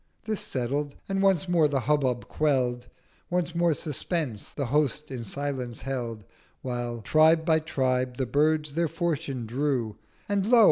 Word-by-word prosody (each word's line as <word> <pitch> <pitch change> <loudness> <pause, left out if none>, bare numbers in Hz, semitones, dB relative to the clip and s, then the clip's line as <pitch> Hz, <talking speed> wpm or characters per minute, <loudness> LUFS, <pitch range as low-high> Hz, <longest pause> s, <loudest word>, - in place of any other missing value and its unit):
This 215 -2 -1
settled, 140 +3 -2
and 195 0 0
once 190 -3 +3
more 170 -3 +4
the 140 -2 0
Hubbub 130 -2 +1
quell'd, 125 -5 0 0.4
Once 175 -1 0
more 170 -2 +2
Suspense 150 - -3
the 140 - -3
Host 150 +2 0
in 125 -3 -4
Silence 130 0 -4
held, 120 -6 -4 0.4
While, 120 -2 -3
Tribe 160 +6 +5
by 160 -1 +4
Tribe, 130 -5 0
the 130 - 0
Birds 150 +3 +1
their 170 +2 +1
fortune 150 -7 -2
drew; 125 -3 -1 0.3
And 200 -1 0
Lo! 240 0 +6
145 Hz, 150 wpm, -27 LUFS, 125-160 Hz, 0.4 s, Lo